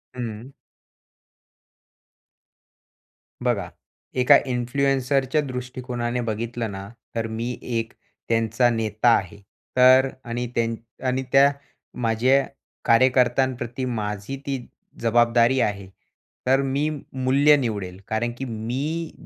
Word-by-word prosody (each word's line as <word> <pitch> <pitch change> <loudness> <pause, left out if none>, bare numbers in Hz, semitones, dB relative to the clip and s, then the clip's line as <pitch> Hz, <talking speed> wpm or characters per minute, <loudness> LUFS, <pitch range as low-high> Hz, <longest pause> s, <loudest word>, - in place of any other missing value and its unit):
हं. 120 +2 -6 2.9
बघा, 100 -8 0 0.5
एका 130 +3 +7
इन्फ्लुएन्सरच्या 135 +3 +1
दृष्टिकोनाने 125 -2 -4
बघितलं 115 0 -3
ना, 95 0 -7 0.3
तर 115 -1 -1
मी 115 +2 -4
एक 115 -1 -3 0.4
त्यांचा 115 +1 +2
नेता 115 0 +1
आहे, 95 +3 -6 0.4
तर 130 +1 +7
आणि 120 +1 -3
त्या 115 -1 +2 0.4
आणि 130 +1 0
त्या 140 +1 +6 0.5
माझ्या 125 +4 +3 0.4
कार्यकर्त्यांप्रती 125 0 +2
माझी 105 +1 -3
ती 135 -3 -3 0.4
जबाबदारी 120 +2 +3
आहे. 100 -2 -2 0.6
तर 135 +1 +4
मी 140 +3 0 0.2
मूल्य 135 +3 +4
निवडेल. 100 -7 -3
कारण 115 +2 -1
की 135 - -4
मी 130 +9 -3
120 Hz, 95 wpm, -24 LUFS, 115-130 Hz, 2.9 s, एका